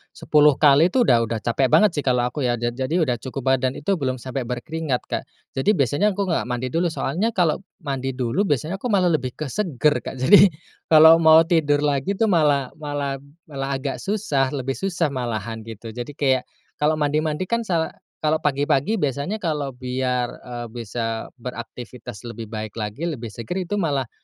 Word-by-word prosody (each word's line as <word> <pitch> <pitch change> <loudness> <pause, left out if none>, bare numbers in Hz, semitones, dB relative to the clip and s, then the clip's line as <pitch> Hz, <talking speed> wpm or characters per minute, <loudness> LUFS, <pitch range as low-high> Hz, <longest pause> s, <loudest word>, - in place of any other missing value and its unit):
10 150 -1 +4
kali 150 +3 +5
itu 245 +6 +3
udah 120 - +4
udah 115 0 -2
capek 125 +3 +1
banget 210 - +5
sih 145 - -1
kalau 125 -3 +1
aku 125 +4 -3
ya. 120 -2 +1
Ja 120 +1 -2
jadi 130 +7 -1
udah 120 -4 -2
cukup 130 0 -1
badan 130 0 0
itu 195 +8 0
belum 130 -7 -1
sampai 130 +2 -4
berkeringat 135 +2 -2
Kak. - - -3 0.3
Jadi 135 +9 0
biasanya 145 - +2
aku 200 - +1
nggak 170 -3 0
mandi 125 +1 -3
dulu, 170 +1 +1
soalnya 185 +6 -1
kalau 180 -7 +1 0.2
mandi 135 -2 -3
dulu 130 - 0
biasanya 155 +7 -1
aku 250 - -2
malah 185 -5 +3
lebih 130 -5 -2
ke 155 - -4
seger, 150 - 0
Kak, - - -7
jadi 190 +10 +7 0.4
kalau 160 +1 +8
mau 160 0 +7
tidur 150 -4 +2
lagi 145 +7 0
tuh 225 - +3
malah 150 -9 +2
malah 145 -2 -3 0.2
malah 135 -3 -5
agak 135 0 -4
susah, 190 -10 0
lebih 135 0 -2
susah 175 -4 -1
malahan, 115 -3 -3
gitu. 110 0 -9
Jadi 125 +5 -7
kayak, 130 -3 +1 0.3
kalau 155 +1 +2
mandi-mandi 150 +3 0
kan 235 +5 0
sa 170 -7 -1 0.2
kalau 155 +1 0
pagi-pagi 145 +7 +1
biasanya 145 - -1
kalau 155 -8 -2
biar, 125 -1 -2
eee, 120 -1 -6
bisa 115 -1 -4
beraktivitas 120 -2 -8
lebih 115 -2 -7
baik 110 -1 -5
lagi, 110 +7 -4
lebih 130 -9 -4
seger 115 - -4
itu 185 +3 -3
malah 140 - -1
140 Hz, 185 wpm, -22 LUFS, 125-160 Hz, 0.4 s, kalau